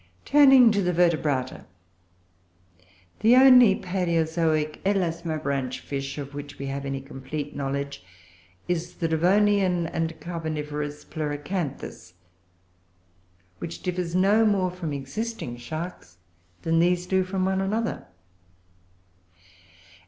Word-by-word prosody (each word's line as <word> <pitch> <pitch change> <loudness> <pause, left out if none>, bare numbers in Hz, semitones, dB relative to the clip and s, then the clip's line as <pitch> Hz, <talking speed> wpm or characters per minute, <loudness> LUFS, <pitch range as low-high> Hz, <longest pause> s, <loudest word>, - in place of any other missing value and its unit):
Turning 270 -5 +7
to 205 -1 +1
the 180 -1 +1
Vertebrata, 155 -7 0 1.5
the 225 +4 +5
only 250 -5 +8
palaeozoic 165 -4 0
Elasmobranch 160 -8 -1
Fish 135 0 -5
of 140 -1 -6
which 145 0 -8
we 140 - -5
have 135 0 -4
any 135 0 -3
complete 140 +2 -7
knowledge 140 -3 -4 0.6
is 175 -1 -2
the 165 - -1
Devonian 185 +2 +2
and 165 -1 -3
Carboniferous 150 -3 -5
Pleuracanthus, 145 - -5 1.5
which 170 - -7
differs 180 -2 -2
no 200 +4 +4
more 195 -4 +2
from 175 -4 -5
existing 140 - -5
Sharks 155 - -7 0.5
than 165 0 +2
these 175 +1 +2
do 190 0 +1
from 185 0 -2
one 190 0 0
another. 220 +4 -2
165 Hz, 105 wpm, -25 LUFS, 145-190 Hz, 1.5 s, only